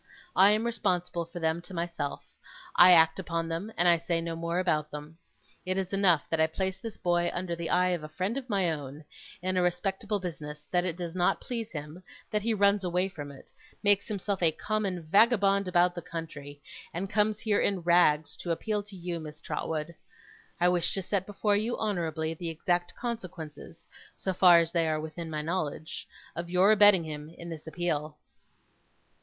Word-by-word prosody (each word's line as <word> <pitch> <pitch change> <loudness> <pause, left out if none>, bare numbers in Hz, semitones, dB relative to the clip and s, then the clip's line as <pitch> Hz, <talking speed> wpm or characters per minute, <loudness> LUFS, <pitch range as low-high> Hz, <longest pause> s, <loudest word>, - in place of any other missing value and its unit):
I 195 +2 +7
am 215 +2 +2
responsible 180 -7 -1
for 170 +2 -8
them 160 +1 0
to 185 +1 -9
myself, 170 -4 -3 0.5
I 180 +1 +9
act 160 0 +6
upon 165 -2 -2
them, 170 +7 -4
and 175 - +3
I 170 -1 +6
say 170 0 0
no 165 0 -4
more 170 +1 -2
about 155 -5 +1
them. 150 +2 -9 0.4
It 185 +1 -1
is 190 0 -3
enough 185 -6 +4
that 165 - +1
I 160 - +5
place 190 +3 -2
this 225 +1 -7
boy 175 0 +1
under 175 -1 -2
the 170 -1 -4
eye 180 0 +3
of 175 -3 -1
a 155 - -7
friend 185 +8 -2
of 270 -2 -5
my 195 -5 +2
own, 145 0 -7 0.4
in 185 0 0
a - - +4
respectable 195 +4 -1
business; 150 -4 -7
that 180 0 +2
it 170 -2 -1
does 170 -2 -5
not 180 -1 +2
please 230 -3 -5
him; 150 +3 -7 0.3
that 210 -1 +1
he 230 +3 0
runs 200 -1 +3
away 180 +1 0
from 145 -6 -8
it; 135 - -15 0.3
makes 205 -1 +4
himself 200 -2 -2
a 165 -2 +5
common 195 -1 -2
vagabond 200 +2 +4
about 180 0 +3
the 175 - -6
country; 155 -4 -8 0.3
and 180 +4 -3
comes 210 +1 +1
here, 210 -2 +1
in 195 -3 +1
rags, 170 -3 +3
to 175 - -7
appeal 210 +5 -1
to 200 -1 -12
you, 175 -1 -4
Miss 155 -1 -9
Trotwood. 160 0 -3 0.7
I 175 - +4
wish 175 -1 +1
to 195 - -2
set 190 0 -1
before 205 0 +1
you, 220 +4 -1
honourably, 165 -6 -2
the 165 +1 -5
exact 175 +2 -1
consequences 180 -9 -7 0.3
so 190 - -2
far 180 -1 +7
as 165 0 +2
they 170 -2 +1
are 155 -1 0
within 160 +2 -6
my 155 -1 -3
knowledge 160 -2 -3 0.3
of 170 +1 -5
your 185 +3 +5
abetting 205 -4 +6
him 150 -1 -7
in 170 +1 -10
this 160 -1 -8
appeal. 155 -3 -2
175 Hz, 195 wpm, -29 LUFS, 160-195 Hz, 0.7 s, I